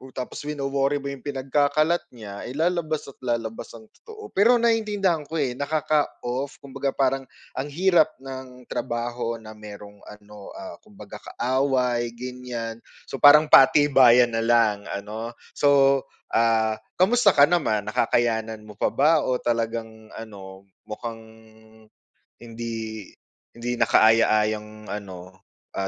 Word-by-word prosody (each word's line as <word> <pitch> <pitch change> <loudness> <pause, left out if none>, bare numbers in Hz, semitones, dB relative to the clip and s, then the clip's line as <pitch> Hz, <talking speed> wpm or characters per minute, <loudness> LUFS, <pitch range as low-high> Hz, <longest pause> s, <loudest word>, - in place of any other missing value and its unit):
tapos 125 - -6
wino-worry 140 -1 -1
mo 140 -1 -4
yung 140 - -9
pinagkakalat 145 +4 +1
niya, 100 -3 -9
eh, - - -6
lalabas 160 -1 -1
at - - -29
lalabas 115 -3 -3
ang 115 - -12 0.2
totoo. 430 -2 -12
Pero 230 +5 +4
naiintindihan 210 -9 0
ko, 165 - -7
eh, 140 -5 0
nakaka-off. 145 -3 -2
Kumbaga 135 0 -4
parang 135 -1 0 0.2
ang 135 +2 -4
hirap 165 0 +2
ng 130 -1 -10
trabaho 120 0 -4
na 110 -1 -11
mayrong 105 -1 -12
ano, 105 -1 -13
ah, 225 -1 -9
kumbaga 210 -3 -13
kaaway, 125 -2 -1
ganyan. 125 -2 -6 0.3
So 135 - -5
parang 150 +1 +7
patibayan 130 -3 +6
na 115 - -1
lang, 115 -3 +2
ano? 110 +4 -6 0.2
So, 140 -1 +4 0.3
ah, 110 -1 +2 0.2
kamusta 205 +3 +3
ka 140 - +7
naman 145 -10 +2
nakakayanan 110 -1 -1
mo 105 -1 -14
pa - - +2
ba 155 +3 +3
o 130 - -1
talagang 115 -2 -3
ano 95 -3 -10 0.2
mukhang 115 +1 -6 1.2
hindi 115 -3 -7 0.5
hindi 120 +1 -4
nakaaya-ayang 110 -1 +2
ano, 95 -2 -8 0.3
ah, 95 - -3
120 Hz, 125 wpm, -24 LUFS, 110-145 Hz, 1.2 s, parang